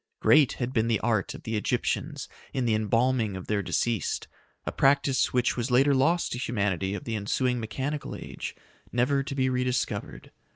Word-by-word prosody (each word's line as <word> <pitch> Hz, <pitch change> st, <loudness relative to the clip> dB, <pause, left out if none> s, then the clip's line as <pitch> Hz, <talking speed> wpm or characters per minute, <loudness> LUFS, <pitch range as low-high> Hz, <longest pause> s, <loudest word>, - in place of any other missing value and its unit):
Great 150 Hz, -4 st, +5 dB
had 125 Hz, 0 st, -3 dB
been 115 Hz, -2 st, +2 dB
the 115 Hz, -3 st, +2 dB
art 110 Hz, -4 st, 0 dB
of -, -, -11 dB
the 110 Hz, -, -3 dB
Egyptians 105 Hz, -, -1 dB, 0.3 s
in 130 Hz, -2 st, 0 dB
the 115 Hz, -, +2 dB
embalming 110 Hz, -1 st, +1 dB
of 95 Hz, -, -7 dB
their 105 Hz, -1 st, 0 dB
deceased, 115 Hz, +3 st, -1 dB, 0.4 s
a -, -, -2 dB
practice 135 Hz, -1 st, +3 dB
which 125 Hz, -1 st, +1 dB
was 120 Hz, +1 st, -2 dB
later 135 Hz, +3 st, +4 dB
lost 165 Hz, +6 st, +2 dB
to 125 Hz, -, -3 dB
humanity 100 Hz, -5 st, -1 dB
of 95 Hz, -, -6 dB
the 115 Hz, -, -3 dB
ensuing 125 Hz, +4 st, 0 dB
mechanical 135 Hz, +7 st, -4 dB
age, -, -, -7 dB, 0.4 s
never 130 Hz, +4 st, +2 dB
to 135 Hz, 0 st, -5 dB
be 130 Hz, -1 st, +2 dB
rediscovered. 125 Hz, 0 st, -2 dB
120 Hz, 175 wpm, -27 LUFS, 110-130 Hz, 0.4 s, Great